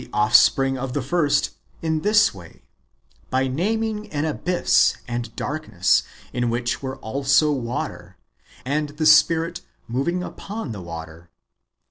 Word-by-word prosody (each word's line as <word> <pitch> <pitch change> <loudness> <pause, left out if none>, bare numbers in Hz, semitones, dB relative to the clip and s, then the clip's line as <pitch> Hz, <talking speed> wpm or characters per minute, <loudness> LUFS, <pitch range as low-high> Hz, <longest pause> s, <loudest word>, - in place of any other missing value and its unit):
75 - - -4
offspring 135 +5 +4
of 130 -1 -4
the 145 - -1
first, 145 0 +1 0.3
in 160 -1 0
this 210 +2 +4
way 85 -4 -14 0.3
— - - -36
by 130 +1 +1
naming 215 +8 -2
an 150 +1 -1
abyss 175 +3 +2
and 120 -1 -3
darkness, 145 - +1 0.3
in 120 -1 0
which 120 +1 -2
were 130 -1 -5
also 140 +5 +2
water, 125 -4 -4 0.5
and 150 +3 -1
the 155 - 0
Spirit 165 +2 +4 0.3
moving 140 +10 -1
npon 200 - -6
the 100 -4 -7
water. 85 0 -9
140 Hz, 135 wpm, -23 LUFS, 120-165 Hz, 0.5 s, offspring